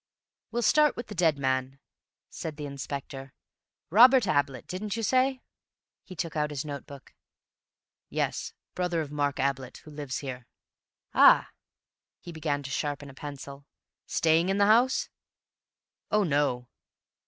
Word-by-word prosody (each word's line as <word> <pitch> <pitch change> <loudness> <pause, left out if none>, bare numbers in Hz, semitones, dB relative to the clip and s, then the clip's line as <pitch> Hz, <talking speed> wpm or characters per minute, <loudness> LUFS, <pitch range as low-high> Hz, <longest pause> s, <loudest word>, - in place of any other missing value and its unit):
"We'll 240 +1 -2
start 300 +5 +4
with 240 - -7
the - - -6
dead 165 -5 +2
man," 130 0 -1 0.5
said 160 -2 -7
the 150 - -5
Inspector. 140 -1 -7 0.6
"Robert 250 +4 +7
Ablett, 140 -5 0
didn't 200 +3 -4
you 225 - -3
say?" 255 +2 +2 0.6
He 185 - -11
took 165 -1 -4
out 150 -1 0
his 145 -1 -4
notebook. 140 -1 -9 1.0
"Yes. - - -2 0.2
Brother 175 -2 -1
of 150 -2 -6
Mark 145 -1 -1
Ablett, 135 -2 -2
who 155 - -11
lives 145 -3 -5
here." 125 -3 -7 0.7
"Ah!" - - +6 0.7
He 175 - -10
began 150 -3 -2
to 135 - -7
sharpen 145 0 -3
a - - -16
pencil. 140 0 -9 0.4
"Staying 165 +2 +2
in 195 - +1
the 200 - +4
house?" 235 +5 +4 1.0
"Oh, 210 0 +3
no!" 140 -6 0
150 Hz, 140 wpm, -28 LUFS, 140-185 Hz, 1.0 s, Robert